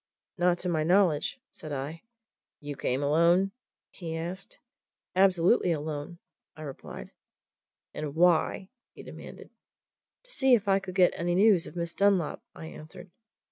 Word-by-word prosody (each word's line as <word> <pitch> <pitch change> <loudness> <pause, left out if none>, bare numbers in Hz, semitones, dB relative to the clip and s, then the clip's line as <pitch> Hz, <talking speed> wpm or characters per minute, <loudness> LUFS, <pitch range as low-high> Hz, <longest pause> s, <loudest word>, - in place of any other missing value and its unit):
"Not 175 -2 +2
to 180 - -5
my 165 -3 +1
knowledge!" 180 - +2
said 155 - -8
I. 145 +4 -5 0.6
"You 145 -1 -6
came 135 +1 -1
alone?" 170 +6 +3 0.4
he 165 -3 -6
asked. 175 +4 -6 0.6
"Absolutely 185 0 +4
alone," 150 +2 -5 0.4
I 155 - -8
replied. 140 -3 -9 0.8
"And 150 -1 -5
why?" 175 +2 +2 0.3
he - - -11
demanded. - - -11 0.7
"To - - -10
see 265 - +4
if 215 -3 -3
I 195 0 +4
could 190 -2 -8
get 185 -2 +5
any 175 +1 -1
news 195 -3 +4
of - - -11
Miss 170 0 -3
Dunlop," 200 -5 +2
I - - -9
answered. 160 +3 -11
175 Hz, 140 wpm, -28 LUFS, 155-190 Hz, 0.8 s, get